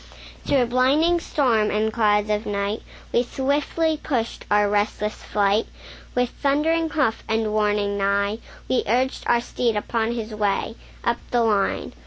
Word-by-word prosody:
Through 265 -3 +3
blinding 275 +8 +3
storm 235 -10 +1
and 215 +1 0
clouds 210 -2 +2
of 210 +1 -1
night, 200 +1 -2 0.3
We 235 - +4
swiftly 290 +5 0
pushed 235 -6 -2
our 210 0 +4
restless 210 +1 0
flight; 205 +1 +1 0.5
With 250 -1 +1
thundering 315 +3 +1
hoof 275 -8 0
and 220 -1 0
warning 205 -1 +1
neigh, 200 +2 +1 0.3
We 255 - +2
urged 255 +5 0
our 240 0 +3
steed 240 -1 -1
upon 225 +2 -1
his 225 -2 -5
way 210 +1 -1 0.3
Up 235 0 +2
the 240 -1 +2
line. 210 -3 0
225 Hz, 145 wpm, -23 LUFS, 210-255 Hz, 0.5 s, We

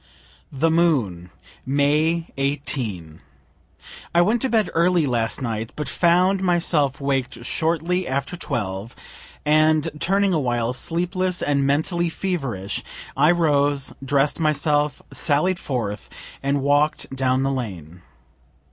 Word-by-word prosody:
THE 155 +4 +1
MOON. 125 - +1 0.3
May 150 +5 +1
18. 130 - -3 0.9
I 170 - +6
went 225 +6 +1
to 265 - 0
bed 220 -5 +1
early 170 -1 +3
last 120 -1 -1
night, 115 -2 -3
but 150 - -4
found 180 +3 +3
myself 165 -6 +1
waked 135 -4 -2
shortly 170 +5 0
after 140 +5 -2
12, 105 - -4 0.5
and, 155 +1 +3
turning 195 +3 +2
awhile, 120 -6 0
sleepless 180 +5 -1
and 140 -1 +1
mentally 170 +4 +1
feverish, 140 - -3 0.3
I 145 +3 +4
rose, 145 -5 +2
dress'd 140 +3 +1
myself, 150 -1 +1
sallied 175 +4 +1
forth 115 -7 -4 0.3
and 140 0 0
walk'd 145 -1 +1
down 130 0 +1
the 135 - +1
lane. 90 - -6
145 Hz, 115 wpm, -22 LUFS, 130-170 Hz, 0.9 s, I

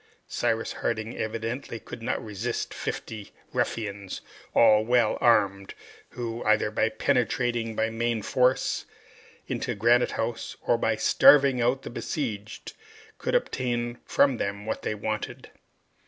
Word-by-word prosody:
Cyrus 115 -1 -1
Harding 110 0 -3
evidently 115 +2 -4
could 115 - -10
not 115 - -2
resist 110 +3 -3
fifty 105 -3 -6 0.2
ruffians, 100 -3 -3 0.3
all 110 -2 +6
well 120 -1 +3
armed, 100 -4 +2 0.3
who, 120 -1 -5
either 110 0 +2
by - - +1
penetrating 120 -2 0
by 110 +1 0
main 115 -1 -1
force 125 +3 +1 0.6
into - - -3
Granite 120 +4 +3
House, 115 0 -3
or 120 - +3
by 110 -1 +1
starving 135 +2 +6
out 125 +3 +1
the - - -7
besieged, 110 -5 -4 0.5
could - - -1
obtain 120 - -1
from 135 -3 +3
them 100 0 -3
what 110 - -3
they 105 - -2
wanted. 105 +1 -4
115 Hz, 125 wpm, -27 LUFS, 110-120 Hz, 0.6 s, all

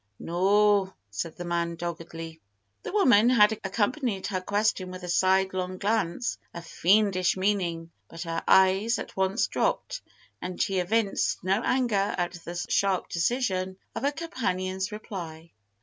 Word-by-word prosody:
"No," 195 +2 +2 0.2
said 155 +11 -4
the 175 - -6
man, 170 -1 -1
doggedly. 165 -1 -7 0.4
The - - -6
woman 245 - +5
had 210 -4 +6
accompanied 205 +1 -1
her 185 -3 -2
question 200 -1 0
with 185 0 -8
a - - -5
sidelong 185 0 +1
glance 210 +1 -1 0.2
of 170 0 -7
fiendish 190 +1 +2
meaning, 180 -4 -1 0.2
but 165 0 -7
her 165 -1 -3
eyes 190 +5 +4
at - - -7
once 190 +3 +1
dropped, - - -1 0.4
and 180 -1 -5
she 195 -1 +1
evinced 200 +2 0
no 195 +4 +1
anger 235 -6 +1
at 175 -1 -1
the 175 - -7
sharp 195 -2 +1
decision 185 -1 -1 0.2
of 225 - -4
her 280 +2 +1
companion's 190 - -3
reply. 170 -6 -8
190 Hz, 140 wpm, -27 LUFS, 175-210 Hz, 0.4 s, had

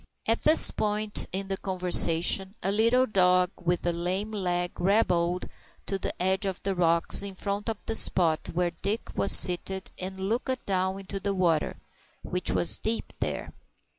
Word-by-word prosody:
At 225 +1 0
this 310 +1 +7
point 210 0 -2
in 195 +1 -3
the 195 0 -3
conversation 185 0 +2
a 195 - 0
little 230 +5 +2
dog 180 -4 +2
with 175 0 -1
a 175 - 0
lame 185 +5 -3
leg 180 -4 -3
hobbled 180 -2 0 0.4
to 195 - -3
the - - -5
edge 190 +2 -1
of 190 -2 -4
the 195 - -1
rocks 170 -1 +2
in 200 -1 -5
front 200 +3 -4
of 220 - -3
the - - -3
spot 170 -7 +2
where 175 +1 -1
Dick 200 +6 -5
was 200 - +3
seated, 190 +1 +4
and 190 +1 -7
looked 240 +6 -3
down 190 0 -2
into 195 0 -6
the 200 0 -3
water, 170 -4 0 0.5
which 180 0 -3
was 175 - +2
deep 225 +1 -3
there. - - -5
190 Hz, 165 wpm, -26 LUFS, 180-205 Hz, 0.5 s, this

